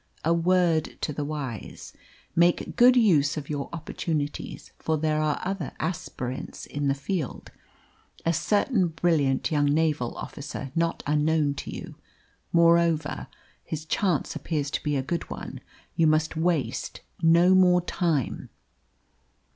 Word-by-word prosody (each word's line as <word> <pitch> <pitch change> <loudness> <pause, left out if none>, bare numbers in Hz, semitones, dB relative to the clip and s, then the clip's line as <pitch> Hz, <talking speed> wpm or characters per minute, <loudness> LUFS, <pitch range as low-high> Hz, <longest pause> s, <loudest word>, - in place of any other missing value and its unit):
A 165 - +4
word 170 -2 +2
to 150 - -2
the 145 - -3
wise: 145 -6 -6 0.4
make 170 +1 +2
good 245 +1 +7
use 165 - +4
of 150 0 -5
your 145 -2 -3
opportunities, 155 -2 -4
for 160 -1 0
there 155 0 +1
are 150 -1 0
other 190 -6 -3
aspirants 130 -6 -4
in 145 0 -3
the 135 - +2
field 140 +1 -4 0.7
a 165 - +3
certain 200 - +2
brilliant 155 -5 +1
young 145 -2 +2
naval 150 -4 +1
officer 140 -2 -6
not 165 0 0
unknown 150 0 +2
to - - -7
you. - - -7 0.6
Moreover 170 -2 +3 0.4
his 155 0 -5
chance 175 -1 0
appears 145 -4 -2
to - - -2
be 150 -1 -1
a 135 - 0
good 170 +4 -3
one. 65 -3 -7 0.3
You 165 - +4
must 155 +1 +2
waste 165 -3 -1 0.2
no 170 +3 +5
more 180 -1 +5
time." 170 -6 -1
160 Hz, 135 wpm, -26 LUFS, 145-170 Hz, 0.7 s, good